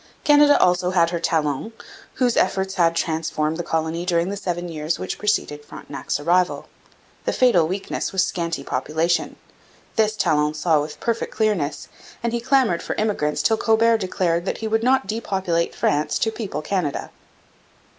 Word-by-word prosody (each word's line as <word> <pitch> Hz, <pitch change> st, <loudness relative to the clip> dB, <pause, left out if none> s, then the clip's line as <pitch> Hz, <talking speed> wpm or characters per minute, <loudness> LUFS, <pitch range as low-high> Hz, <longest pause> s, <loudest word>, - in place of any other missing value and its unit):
] -, -, -34 dB
Canada 290 Hz, 0 st, +6 dB
also 180 Hz, 0 st, +3 dB
had 170 Hz, -2 st, +2 dB
her 170 Hz, -, -2 dB
Talon, 160 Hz, +4 st, -1 dB, 0.4 s
whose 245 Hz, -2 st, +1 dB
efforts 190 Hz, 0 st, +1 dB
had 170 Hz, -3 st, +2 dB
transformed 160 Hz, -1 st, -1 dB
the -, -, -2 dB
colony 165 Hz, 0 st, -2 dB
during 175 Hz, 0 st, +1 dB
the 200 Hz, -, -3 dB
seven 175 Hz, -3 st, -3 dB
years 155 Hz, -1 st, -2 dB
which -, -, -5 dB
preceded 150 Hz, -8 st, -1 dB
Frontenac's 145 Hz, 0 st, -5 dB
arrival. 175 Hz, +4 st, +1 dB, 0.6 s
The -, -, 0 dB
fatal 210 Hz, -11 st, +4 dB
weakness 190 Hz, +3 st, -3 dB
was 190 Hz, -1 st, +2 dB
scanty 170 Hz, -5 st, -3 dB
population. 160 Hz, +7 st, -1 dB, 0.6 s
This 215 Hz, -1 st, +2 dB
Talon 150 Hz, -6 st, +1 dB
saw 155 Hz, -1 st, +2 dB
with 150 Hz, 0 st, -7 dB
perfect 230 Hz, -1 st, -2 dB
clearness, 175 Hz, -10 st, 0 dB, 0.4 s
and 235 Hz, 0 st, -1 dB
he 235 Hz, -, 0 dB
clamoured 255 Hz, -9 st, +2 dB
for -, -, -4 dB
immigrants 200 Hz, -9 st, 0 dB
till 220 Hz, -, +3 dB
Colbert 225 Hz, +1 st, +3 dB
declared 180 Hz, -3 st, -1 dB
that -, -, -2 dB
he 225 Hz, -, -4 dB
would 220 Hz, +1 st, +1 dB
not 260 Hz, +1 st, +2 dB
depopulate 190 Hz, -5 st, -1 dB
France 150 Hz, +1 st, +1 dB
to 220 Hz, -, 0 dB
people 195 Hz, -9 st, -5 dB
Canada. 175 Hz, -4 st, -2 dB
175 Hz, 165 wpm, -22 LUFS, 160-215 Hz, 0.6 s, Canada